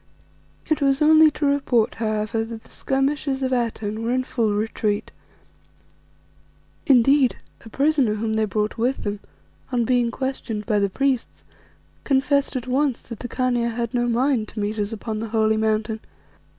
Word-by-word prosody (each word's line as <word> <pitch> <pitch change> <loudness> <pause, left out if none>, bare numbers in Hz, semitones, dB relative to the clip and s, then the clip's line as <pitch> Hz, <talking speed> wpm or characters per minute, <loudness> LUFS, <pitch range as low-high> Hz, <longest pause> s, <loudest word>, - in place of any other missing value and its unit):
It 310 -1 0
was 275 -1 +2
only 315 0 +7
to 300 0 -3
report, 270 -5 +2
however, 215 0 -1
that 225 0 -7
the - - -19
skirmishers 270 0 -1
of 260 - 0
Atene 220 -3 -2
were 230 - -2
in 255 +1 +1
full 230 -4 0
retreat. 210 -1 -1 1.8
Indeed, 270 0 +5 0.3
a 225 - -11
prisoner 275 -4 +2
whom 220 +1 -2
they 220 0 +1
brought 210 +1 -2
with 250 +4 0
them, 205 0 -3 0.5
on 240 -2 +1
being 245 -1 +2
questioned 235 -4 -4
by 210 -1 +1
the 200 0 +1
priests, 270 +4 -1 0.6
confessed 280 +1 +1
at 250 - -3
once 265 0 0
that 230 -2 -9
the 245 - -5
Khania 245 -2 0
had 235 0 -3
no 240 -1 +1
mind 240 -1 +1
to 220 - -8
meet 210 +1 -2
us 205 +1 -1
upon 220 0 -4
the 225 0 -4
holy 220 0 +2
Mountain. 220 0 0
235 Hz, 165 wpm, -23 LUFS, 220-270 Hz, 1.8 s, only